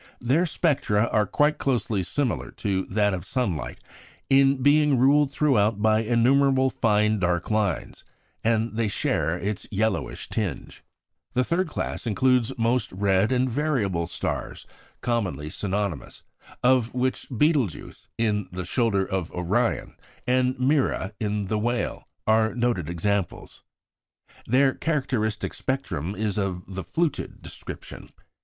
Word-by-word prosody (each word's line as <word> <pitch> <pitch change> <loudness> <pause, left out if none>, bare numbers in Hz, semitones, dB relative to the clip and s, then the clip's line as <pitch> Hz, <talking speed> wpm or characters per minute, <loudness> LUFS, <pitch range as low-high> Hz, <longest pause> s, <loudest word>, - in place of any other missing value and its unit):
Their 140 +9 +2
spectra 130 - +1
are 105 -1 +2
quite 150 +8 +2
closely 115 -6 0
similar 90 - -1
to 95 -2 -1
that 105 0 +1
of 90 -3 -3
sunlight, 90 - -2 0.5
in 135 -1 +4
being 145 -1 +4
ruled 140 +3 +4
throughout 115 -8 +2
by 110 +1 +3
innumerable 130 +3 +3
fine 105 -1 +2
dark 85 +1 0
lines; 105 -3 -1 0.4
and 115 0 +1
they 115 -1 +1
share 90 -4 0
its 100 +3 -4
yellowish 110 +2 -1
tinge. - - -4 0.5
The 125 - +3
third 175 +6 0
class 150 - -4
includes 125 +2 +2
most 115 0 +1
red 95 +2 +2
and 130 0 +2
variable 115 - 0
stars - - -4 0.4
(commonly 90 - -2
synonymous), 100 -4 -3 0.4
of 125 -2 +3
which 130 +1 -1
Betelgeux 130 - 0 0.2
in 105 -4 0
the 90 0 -5
shoulder 100 -1 +1
of 95 -3 -3
Orion, 100 +7 0 0.3
and 130 +1 +1
"Mira" 130 -7 +1
in 105 -2 -1
the 105 +2 -1
Whale, 120 +2 -2 0.2
are 110 +1 +3
noted 120 -9 0
examples. 95 +3 -2 0.9
Their 130 +3 +4
characteristic 130 -9 -1
spectrum 100 - -3
is 105 0 -1
of 95 -3 -2
the 95 0 -5
"fluted" 160 - -2
description. - - -9
110 Hz, 125 wpm, -25 LUFS, 100-130 Hz, 0.9 s, in